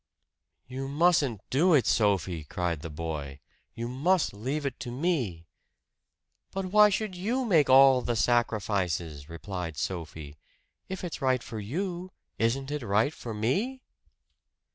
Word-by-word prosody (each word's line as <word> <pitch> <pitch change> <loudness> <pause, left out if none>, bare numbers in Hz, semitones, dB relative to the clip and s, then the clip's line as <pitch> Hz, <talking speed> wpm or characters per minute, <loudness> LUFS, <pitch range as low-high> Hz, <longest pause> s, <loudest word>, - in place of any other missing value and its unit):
"You 130 +1 -5
mustn't 145 - +2
do 165 +6 +4
it, 135 - +3
Sophie!" 95 -6 +1
cried 85 0 -2
the 80 - -6
boy. 75 -3 -5 0.4
"You 115 +1 -4
must 155 - +1
leave 135 +9 -3
it 135 -3 -3
to 125 - -5
me!" 125 - -1 1.0
"But 195 0 -4
why 210 +3 +6
should 210 -1 -2
you 230 +9 -1
make 165 - +4
all 135 -1 +7
the 120 - -1
sacrifices?" 95 - 0
replied 85 -1 -6
Sophie. 80 -4 -5 0.5
"If 190 0 -5
it's 170 -3 -5
right 130 -2 +1
for 110 - -6
you, 175 - -4 0.3
isn't 135 +5 0
it 150 -1 -2
right 110 +6 +1
for 115 -7 -7
me?" 200 - -1
125 Hz, 140 wpm, -28 LUFS, -, 1.0 s, all